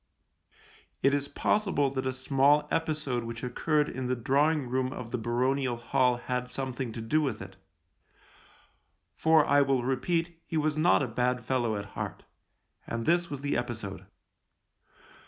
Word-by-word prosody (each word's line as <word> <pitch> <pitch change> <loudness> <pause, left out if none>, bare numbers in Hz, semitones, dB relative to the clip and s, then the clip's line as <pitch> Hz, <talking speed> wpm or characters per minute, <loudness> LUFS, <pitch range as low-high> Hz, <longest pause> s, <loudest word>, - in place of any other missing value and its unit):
It 135 - +4
is 140 0 0
possible 185 -11 +1
that 130 -1 -2
a - - +1
small 140 +3 +3
episode 155 -7 -1
which 115 0 -6
occurred 150 +4 +1
in 130 0 -4
the 130 - +1
drawing 140 +4 +2
room 130 +1 -1
of 120 -3 -7
the 125 - -1
baronial 125 +2 0
hall 125 +1 +2
had 125 0 -3
something 130 -1 -3
to 115 - -5
do 150 +8 +1
with 130 -8 -1
it 95 -1 -9 0.8
— - - -26 0.7
for, 160 -2 +4
I 145 0 +4
will 135 -3 +2
repeat, 165 +6 -1
he 165 - -2
was 155 -1 +1
not 155 -1 +4
a - - -1
bad 125 +1 -1
fellow 120 -3 0
at 100 0 -4
heart. - - -5 0.6
And 115 0 -3
this 175 +1 +2
was 145 -2 -5
the 145 0 -1
episode. 110 -5 -4
130 Hz, 160 wpm, -29 LUFS, 120-150 Hz, 0.8 s, It